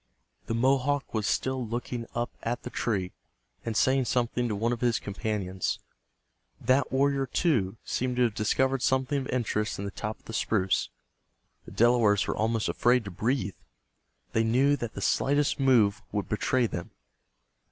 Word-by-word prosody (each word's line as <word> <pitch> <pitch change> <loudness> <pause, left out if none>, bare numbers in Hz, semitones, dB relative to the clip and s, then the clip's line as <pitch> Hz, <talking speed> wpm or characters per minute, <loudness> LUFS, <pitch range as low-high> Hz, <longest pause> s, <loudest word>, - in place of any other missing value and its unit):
The 115 - -1
Mohawk 135 +3 +1
was 110 -2 0
still 130 -1 0
looking 120 +1 -4
up 120 0 -1
at 120 +1 -3
the - - -6
tree, 95 -6 -1 0.5
and 115 -2 -2
saying 130 +2 +3
something 120 0 0
to 105 - -2
one 115 +4 0
of 120 - -5
his 120 -2 +2
companions. 100 -2 -2 0.8
That 130 +1 +2
warrior, 135 0 +2
too, 115 - +1
seemed 125 0 -1
to 125 - +3
have 115 -3 +1
discovered 130 +5 +1
something 130 +2 +1
of 130 - -5
interest 110 -4 -1
in 100 - -4
the 100 - -4
top 105 +3 -5
of - - -32
the 115 - -8
spruce. 95 -4 +1 0.8
The - - -11
Delawares 115 -4 +4
were - - -1
almost 110 0 0
afraid 120 -1 +2
to 100 - -6
breathe. 105 +1 -1 0.8
They 110 - +3
knew 130 +6 +3
that 120 -5 -5
the - - -5
slightest 145 +1 +1
move 120 -7 +4
would 100 -1 -2
betray 120 +3 +1
them. 85 -6 -4
120 Hz, 165 wpm, -28 LUFS, 105-130 Hz, 0.8 s, Delawares